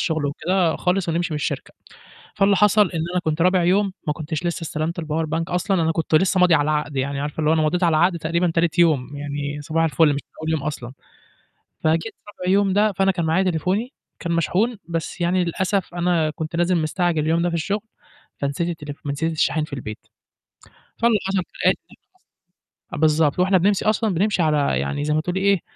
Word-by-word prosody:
شُغل 155 -3 0
وكده 170 +4 0
خالص 180 0 0
ونمشي 170 0 -1
من - - -1
الشركة، 150 - -4 0.6
فاللي 200 -1 +3
حصل 210 +2 +5
إن 165 - -3
أنا 180 - +1
كنت 160 +1 0
رابع 180 -1 +3
يوم 195 +2 +2
ما 150 - +1
كنتش 155 +2 -4
لسه 170 0 -2
استلمت 160 +2 -3
الpower 160 0 -2
bank 160 +2 -1
أصلًا، 180 0 0
أنا 160 0 +1
كنت 160 -1 -2
لسه 185 +3 +3
ماضي 180 -2 +5
على 150 - +4
العقد، 150 -2 -2
يعني 140 +1 -1
عارفة 145 +2 -5
اللي 155 -1 +2
هو - - +4
أنا 160 - +2
مضيت 175 +4 0
على 165 -3 +3
العقد 175 +1 +3
تقريبًا 170 +2 0
تالت 165 0 +1
يوم، 145 -5 +2
يعني 145 0 -4
صباح 165 +2 0
الفُلّ 160 0 +3
مش 140 - -3
من - - -64
أول 160 - -2
يوم 160 -3 0
أصلًا. 135 -4 -5 0.9
فجيت 160 +7 +1
رابع 185 -3 -4
يوم 200 -1 +3
ده، 210 +1 +3
فأنا 195 0 +2
كان 175 -2 -2
معايا 165 +4 +2
تليفوني 185 - -1 0.3
كان 170 -1 -3
مشحون، 195 +8 +1
بس 165 +1 -4
يعني 180 +1 +2
للأسف 190 +2 -1
أنا 175 -3 +1
كنت 160 +1 -5
نازل 175 +1 +2
مستعجل 165 0 0
اليوم 165 +2 +1
ده 175 - +1
في 170 - -3
الشُغل، 200 +6 -1 0.6
فنسيت 140 +5 -2
التليفو 150 -3 -7
فنسيت 160 +4 -1
الشاحن 155 0 +1
في 155 - -13
البيت، 110 -6 -7 0.9
فاللي 230 -2 +3
حصل 195 0 0
كالآتي، 390 - 0
اللي - - -16 1.0
حصل - - -3
أ - - -4
بالضبط، 155 -1 +3
فوإحنا 185 +1 +3
بنمشي 195 +3 +1
أصلًا 215 -1 +1
بنمشي 190 +1 +1
على 150 -3 +1
يعني 145 0 -2
زي 150 - 0
ما 155 - +2
تقولي 180 +4 -2
إيه، 200 -2 +3
170 Hz, 205 wpm, -22 LUFS, 155-185 Hz, 1.0 s, حصل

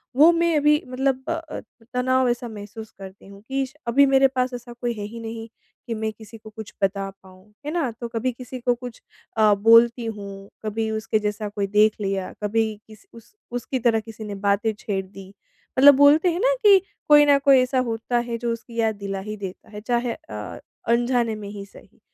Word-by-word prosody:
वो 310 +5 +7
मैं 335 -1 +1
अभी 300 +1 +3
मतलब 265 +1 -1
अ - - +1
अ, 325 -1 -6 0.3
तनाव 255 0 +2
ऐसा 240 0 -2
महसूस 215 0 -9
करती 195 0 -11
हूँ 200 0 -14
कि 270 0 0
श 265 - -15
अभी 280 +4 +5
मेरे 270 0 +5
पास 255 -1 -2
ऐसा 240 0 -8
कोई 240 0 -3
है 210 -2 -7
ही 230 - -7
नहीं 225 0 -7 0.4
कि 230 - -2
मैं 220 0 -2
किसी 220 +1 -13
को 215 0 -13
कुछ 215 -1 -10
बता 195 0 0
पाऊँ, 190 +2 -18
है 300 - -3
ना? 325 -7 0
तो 235 +1 -7
कभी 235 +2 -2
किसी 250 +1 -9
को 245 0 +1
कुछ 245 -1 -10 0.4
अ, 215 -1 +5
बोलती 230 +3 +5
हूँ 200 -2 -7 0.2
कभी 220 +1 -2
उसके 220 0 -1
जैसा 210 0 -3
कोई 200 -1 -3
देख 210 +1 +3
लिया 195 -1 -2
कभी 220 +2 +1 0.2
किस 215 -2 -16
उस 230 - -16 0.2
उसकी 245 +2 -3
तरह 230 -1 +2
किसी 220 0 -10
ने 205 -1 -6
बातें 205 +3 +2
छेड़ 195 -2 -3
दी 195 0 -12 0.5
मतलब 285 +1 +9
बोलते 290 +5 +5
हैं 345 - -3
ना - - +3
कि 395 -2 +8 0.3
कोई 295 0 +7
ना 285 -1 +5
कोई 275 -2 +5
ऐसा 255 +1 0
होता 225 +2 -2
है 235 -1 -3
जो 235 0 -2
उसकी 230 0 -8
याद 220 -2 +1
दिला 200 -1 -5
ही 215 - -6
देता 190 -2 -8
है 210 0 -8
चाहे 240 +1 -1
अ 105 -1 -8 0.3
अनजाने 240 -1 +1
में 205 -1 -8
ही 200 -1 -8
सही। - - -19
230 Hz, 210 wpm, -23 LUFS, 210-255 Hz, 0.5 s, मतलब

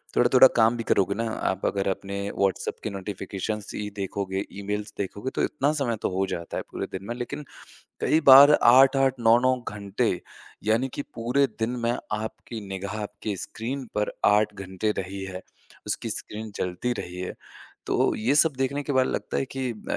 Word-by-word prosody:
थोड़ा-थोड़ा 125 +2 +7
काम 115 +1 +4
भी 115 - -3
करोगे 100 -2 +2
ना, - - -2
आप 95 - -2
अगर 100 -1 0
अपने 100 +1 -3 0.2
व्हाट्सएप 95 -1 0
की - - -2
नोटिफ़िकेशन्स 100 +1 -5
ही 105 0 -3
देखोगे, 95 0 -3
ईमेल्स 105 +1 -4
देखोगे 100 +5 -3
तो - - +1
इतना 145 -1 +1
समय 120 -4 0
तो - - 0
हो 95 - +2
जाता 85 -2 -4
है - - -3
पूरे - - -4
दिन 95 +1 -6
में। 120 - -3
लेकिन 145 +4 -5 0.6
कई 155 - +3
बार 140 +3 +11
8-8 135 +2 +6
9-9 120 +3 +4
घंटे, 100 -1 -1 0.4
यानि 115 +5 +2
कि - - -3
पूरे 125 +4 +2
दिन 110 +1 0 0.2
में 120 - +2 0.3
आपकी 110 +1 -6
निगाह 100 +2 -4
आपके 105 0 -5
स्क्रीन 125 +8 -5
पर 105 0 0
8 105 0 +4
घंटे 95 +1 -3
रही 95 +1 -6
है, 95 -1 -7 0.4
उसकी - - -2
स्क्रीन 110 +1 -5
चलती 90 +7 -1
रही 90 +1 -8
है। 90 - -4 0.5
तो - - +2
ये 120 +6 +1
सब 160 +1 +5
देखने 135 +2 -1
के 145 - -3
बाद 130 -1 +3
लगता - - -3
है - - +1
कि 130 -2 -2 0.2
अ, - - +1
110 Hz, 180 wpm, -26 LUFS, 100-125 Hz, 0.6 s, बार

